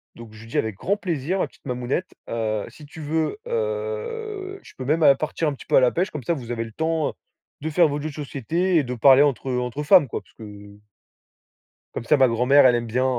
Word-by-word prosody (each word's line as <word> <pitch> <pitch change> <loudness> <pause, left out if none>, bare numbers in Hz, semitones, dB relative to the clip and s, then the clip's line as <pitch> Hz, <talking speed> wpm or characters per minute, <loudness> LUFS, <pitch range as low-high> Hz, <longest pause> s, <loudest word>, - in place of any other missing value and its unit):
Donc, 115 -2 -12
je 110 - -13
lui - - -13
dis: - - -3
«Avec 110 -2 -1
grand 200 - -1
plaisir, 180 -1 -2
ma - - 0
petite - - -26
mamounette, 125 +8 -2 0.2
heu, 110 -2 -2
si 150 - -14
tu 155 +2 -13
veux, 160 - -1
heu, 460 -4 -4
je - - -15
peux 130 - -6
même 155 +3 +2
partir 155 +1 -2
un - - -3
petit - - -12
peu - - +2
à - - +8
la 125 -1 +3
pêche, 180 +3 0
comme 150 -4 -6
ça 170 - 0
vous 120 -6 -6
avez 115 -1 -2
le 115 - -10
temps 160 +3 -1 0.5
de 160 - -3
faire 165 +1 +4
votre 145 0 -3
jeu 155 - -3
de 145 - -10
société 160 +5 -1
et 150 - +3
de 125 0 -4
parler 135 +3 +6
entre 135 -2 0
entre 125 +3 -2
femmes 170 -1 +6
quoi, - - -5
puisque» 110 - -16 1.5
Comme - - -4
ça 145 +5 +3
ma 130 -1 +5
grand-mère 125 +4 +4
elle 125 - +6
aime 120 -1 -2
bien, 125 +4 0
145 Hz, 235 wpm, -23 LUFS, 125-170 Hz, 1.5 s, à